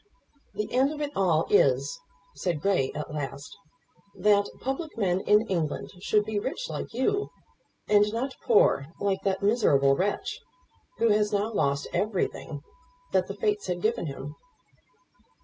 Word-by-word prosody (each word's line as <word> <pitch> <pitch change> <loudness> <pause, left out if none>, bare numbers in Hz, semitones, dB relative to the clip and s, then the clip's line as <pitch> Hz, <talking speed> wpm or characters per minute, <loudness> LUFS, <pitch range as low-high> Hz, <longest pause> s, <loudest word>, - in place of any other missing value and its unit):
"The 210 - -3
end 265 +3 +3
of 305 - -6
it 295 -1 -2
all 175 -5 +2
is," - - +3 0.3
said 175 -5 -2
Grey 165 -7 +1
at 150 0 -5
last, 140 -1 -5 0.6
"that 200 +1 +3
public 270 +2 -4
men 185 -4 +1
in 210 +3 +3
England 170 -8 -2
should 210 +2 +1
be 215 -1 -1
rich 285 - -4
like - - -5
you, 400 - 0 0.6
and 210 0 +4
not 255 +4 -2
poor 205 - +4
like 195 -1 0
that 195 0 -1
miserable 145 - +4
wretch, 200 +6 -2 0.6
who 230 - +3
has 210 0 +2
now 210 +2 0
lost 140 -6 +1
everything 180 -7 -2 0.5
that - - +2
the - - -6
Fates 420 -2 -1
had - - -3
given 450 +2 0
him." - - -6
205 Hz, 150 wpm, -27 LUFS, 180-250 Hz, 0.6 s, and